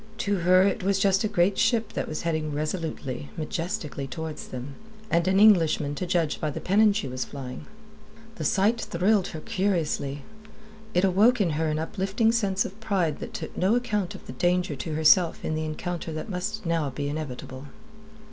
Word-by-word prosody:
To 200 -1 0
her 185 +1 +5
it 195 0 +1
was 195 +1 +1
just 195 0 +3
a - - +2
great 195 -1 +2
ship 225 -1 +2
that - - -2
was 155 - -4
heading 155 -3 -1
resolutely, 150 - -4
majestically, 160 -3 -3
towards 160 +2 -6
them, 130 +2 -7 0.4
and 170 +1 +2
an 190 +1 +3
Englishman 165 -8 +5
to 175 +5 -4
judge 165 -4 0
by 155 - 0
the 145 - -5
pennon 210 +3 +4
she 200 -7 -2
was 130 0 -3
flying. 130 -3 -8 0.7
The - - -4
sight 215 +4 +2
thrilled 190 +3 +1
her 160 - -6
curiously; 170 -9 -1 0.7
it 180 - +3
awoke 210 +6 +4
in 185 -5 +2
her 160 +2 0
an 155 0 0
uplifting 195 +7 0
sense 200 -4 +1
of 200 +4 -8
pride 190 -8 0
that - - -7
took - - -6
no 190 +5 +2
account 210 -7 -1
of - - -12
the - - -8
danger 175 +2 +1
to 140 +4 -4
herself 160 +2 +4
in - - -1
the 155 0 -2
encounter 170 +2 -4
that 155 +8 -5
must 205 +4 -4
now 165 -3 0
be 140 +2 -4
inevitable. 140 -2 -6
175 Hz, 185 wpm, -26 LUFS, 155-200 Hz, 0.7 s, her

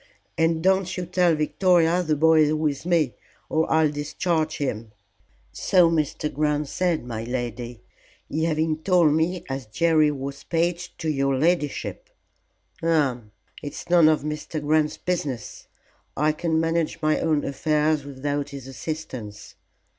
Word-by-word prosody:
"And 165 0 +1
don't 190 -1 +2
you 180 - -3
tell 180 -1 +2
Victoria 170 +2 +2
the 155 -3 0
boy 160 +2 +4
is 150 - +1
with 155 0 -2
me, 160 -8 +2 0.4
or 160 0 0
I'll 160 -2 +3
discharge 155 +2 -1
him." 115 -6 -4 0.6
"So 180 -3 +3
Mr. 155 -1 -1
Grant 150 0 0
said, 175 -7 0
my 115 -2 -5
lady. 120 -1 -5 0.5
He 160 +2 -1
having 160 -1 0
told 170 -3 +3
me 165 +3 0
as 135 -3 -5
Jerry 155 +5 +3
was 140 -1 -5
page 175 +1 -2
to 160 - -5
your 135 -2 +1
ladyship." 170 - -1 0.7
"Hum! 145 -10 0 0.3
It's 145 +3 -7
none 170 -3 +7
of 155 -2 +1
Mr. 150 +1 -4
Grant's 150 +1 +1
business. 145 - -4 0.5
I 150 +2 +3
can 160 +1 -1
manage 165 0 0
my 155 0 +2
own 155 -3 +1
affairs 150 +1 +1
without 145 +1 -3
his 140 -3 -8
assistance. 130 -7 -7
155 Hz, 140 wpm, -24 LUFS, 140-165 Hz, 0.7 s, none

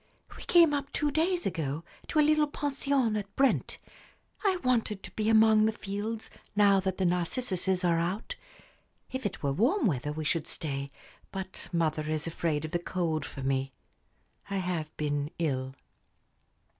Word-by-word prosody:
"We - - -11
came 335 -4 +5
up 280 -1 -2
two 295 -1 0
days 345 +4 +1
ago 160 -4 -2 0.2
to - - -2
a 300 - +6
little 305 0 +4
pension 275 -5 0
at 200 -1 -4
Brent. 270 -1 +2 0.7
I 385 -3 +3
wanted 230 -5 +1
to - - -8
be 215 0 -1
among 220 -1 +6
the - - +2
fields, 215 +2 -5 0.2
now 200 -1 +5
the 190 0 0 0.2
narcissuses 180 +1 0
are 170 -2 +3
out. 190 - -2 0.8
If 260 -4 -1
it 190 - -9
were 140 -1 +1
warm 255 - +2
weather 145 - 0
we 155 +1 -4
should 155 0 0
stay, 140 -2 -3 0.4
but 190 -1 -6
mother 155 -3 0
is 155 0 -1
afraid 160 -2 -1
of 155 - -6
the 175 - 0
cold 165 -4 -1
for 135 - -8
me. 135 0 0 0.8
I 200 - -2
have 180 -4 -2
been 145 -1 -1
ill." 135 -5 -1
190 Hz, 160 wpm, -29 LUFS, 155-235 Hz, 0.8 s, a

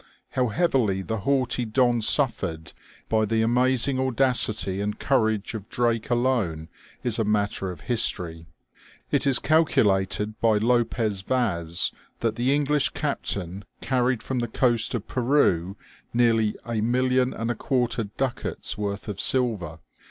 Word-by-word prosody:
How 125 -1 +1
heavily 110 - +1
the 110 +2 -3
haughty 130 +2 0
Don 120 +1 +2
suffered 100 - 0 0.3
by 110 -1 +1
the 110 +1 +1
amazing 130 +3 +2
audacity 120 -6 +1
and 105 +1 -3
courage 110 -6 0
of 105 -2 -7
Drake 120 0 -1
alone 120 -11 0 0.3
is 120 -2 +1
a - - +2
matter 105 -2 -1
of 90 - -8
history. 85 -8 -1 0.6
It - - +2
is 135 -2 +4
calculated 105 - +1
by 110 -2 +3
Lopez 115 -3 0
Vaz 90 -8 0 0.3
that 115 -2 0
the 125 +3 +1
English 145 0 +2
captain 95 +1 -3 0.2
carried 125 -2 0
from 130 -2 -2
the 120 - -1
coast 120 0 +1
of 115 - -5
Peru 110 - +1 0.4
nearly 115 -3 +2
a 115 -2 -2
million 125 +2 +1
and 115 +1 -3
a - - -3
quarter 120 -1 -1
ducats' 125 +5 -3
worth 100 0 -4
of 100 -2 -5
silver. 105 -11 +1
115 Hz, 135 wpm, -25 LUFS, 100-125 Hz, 0.6 s, is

